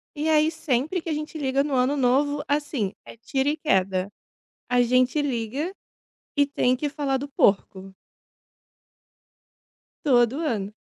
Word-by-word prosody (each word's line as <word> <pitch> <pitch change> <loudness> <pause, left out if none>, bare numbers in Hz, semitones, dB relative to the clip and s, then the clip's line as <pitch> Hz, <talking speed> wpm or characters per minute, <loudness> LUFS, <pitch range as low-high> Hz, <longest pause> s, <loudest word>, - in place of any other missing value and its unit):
E 305 +2 -1
aí, 310 0 +4
sempre 315 +2 -1
que 330 - -6
a - - 0
gente 305 +2 -5
liga 270 -1 +1
no 290 -1 -3
Ano 260 +3 +2
Novo, 285 +3 +2
assim, 285 -8 -1
é - - -12
tiro 265 +4 -1
e 300 - -1
queda. 190 - +1 0.6
A 250 0 +4
gente 255 +4 +2
liga, 275 - -2 0.6
e 285 - +5
tem 265 -3 +1
que 290 +3 -2
falar 280 -2 -1
do 280 +2 -5
porco. 195 -6 +1 2.1
Todo 250 0 +3
ano. 210 -7 -2
270 Hz, 145 wpm, -24 LUFS, 240-295 Hz, 2.1 s, e